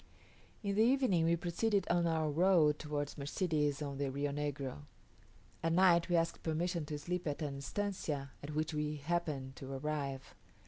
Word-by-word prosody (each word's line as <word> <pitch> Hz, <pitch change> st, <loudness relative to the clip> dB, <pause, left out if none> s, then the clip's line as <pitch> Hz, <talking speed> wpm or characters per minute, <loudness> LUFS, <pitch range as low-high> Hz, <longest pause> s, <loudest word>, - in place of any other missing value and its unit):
In 200 Hz, -1 st, 0 dB
the 210 Hz, -, +3 dB
evening 240 Hz, -9 st, +3 dB
we 170 Hz, +1 st, +4 dB
proceeded 185 Hz, +4 st, 0 dB
on 175 Hz, 0 st, +2 dB
our 160 Hz, -1 st, +1 dB
road 160 Hz, -2 st, +4 dB
towards 145 Hz, -1 st, -3 dB
Mercedes 150 Hz, -1 st, 0 dB
on 140 Hz, -1 st, -5 dB
the 140 Hz, -1 st, 0 dB
Rio 140 Hz, +2 st, -1 dB
Negro. 140 Hz, -, -3 dB, 0.8 s
At 165 Hz, 0 st, +1 dB
night 175 Hz, -1 st, +5 dB
we 175 Hz, -, +3 dB
asked 165 Hz, 0 st, +1 dB
permission 165 Hz, 0 st, -1 dB
to 150 Hz, -, -3 dB
sleep 175 Hz, +3 st, -3 dB
at 145 Hz, +1 st, -2 dB
an 140 Hz, -2 st, -3 dB
estancia 150 Hz, -5 st, -3 dB
at 145 Hz, +1 st, -6 dB
which 155 Hz, +1 st, 0 dB
we 150 Hz, 0 st, -1 dB
happened 145 Hz, -3 st, -2 dB
to 135 Hz, +1 st, -7 dB
arrive. 140 Hz, -1 st, -3 dB
155 Hz, 170 wpm, -35 LUFS, 145-175 Hz, 0.8 s, night